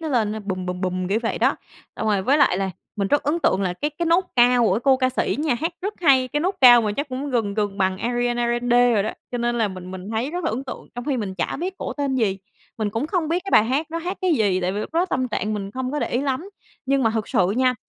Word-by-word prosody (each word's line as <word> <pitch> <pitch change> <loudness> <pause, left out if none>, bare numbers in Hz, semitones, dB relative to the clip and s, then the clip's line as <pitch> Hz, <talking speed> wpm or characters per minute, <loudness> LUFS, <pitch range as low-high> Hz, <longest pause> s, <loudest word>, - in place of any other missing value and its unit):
nó 320 - -4
lên 225 -7 +1
á, 220 - -5
bùm, 185 -2 -3
bùm, 180 0 -4
bùm, 185 -1 -2
kiểu 205 +3 +1
vậy 230 - -2
đó. - - +2 0.4
Xong 220 - -3
rồi, 205 -3 +2
với 275 +9 +3
lại 280 -10 +4
là 195 -1 -1 0.3
mình 200 -1 -1
rất 290 - +2
ấn 295 +4 0
tượng 190 - +2
là 185 -2 0
cái 290 +12 -3
cái 340 - 0
nốt 340 +3 +3
cao 245 0 +5
của 190 - +3
cái 215 - -1
cô 270 -2 +5
ca 255 -1 +1
sĩ 255 - -1
nha, 300 -3 +1
hát 325 +9 -2
rất 410 +2 -3
hay, 265 -6 +4
cái 295 +4 -1
nốt 370 +5 0
cao 245 -2 +9
mà 210 -2 -1
chắc 285 +7 -3
cũng 270 +2 -4
gần 225 -5 0
gần 205 -2 -2
bằng 190 -1 +1
Ariana 240 +1 0
Grande 240 0 +3
rồi 205 - +2
đó. 215 - -2 0.2
Cho 245 - -2
nên 240 0 0
là 220 -2 +2
mình 185 -1 -8
mình 190 +2 -7
thấy 230 +5 -2
rất 350 +1 -4
là - - +1
ấn 245 +5 -4
tượng 260 - -8
trong 245 0 -6
khi 280 -2 0
mình 205 -5 -4
chả 185 - -2
biết 370 +3 -3
cổ - - -4
tên 280 -2 -2
gì, 210 -6 0 0.4
mình 215 -2 -1
cũng 225 +7 -2
không 330 -2 -1
biết 345 +3 0
cái 390 - -5
bài 210 - +6
hát 270 +7 0
nó 335 - -2
hát 355 +4 -4
cái 370 -2 +3
gì, 200 -7 +1
tại 180 +1 -1
vì 200 - -3
lúc 260 - -7
đó 340 +2 +3
tâm 260 -8 -1
trạng 215 -1 -2
mình 200 -1 -4
không 255 +3 -4
có 295 - -1
để - - -1
ý 245 - 0
lắm, 280 +6 -2 0.4
nhưng 275 0 +2
mà 225 - +3
thực 220 -1 -2
sự 190 -7 +2
nha 255 0 +3
240 Hz, 305 wpm, -22 LUFS, 205-285 Hz, 0.4 s, cao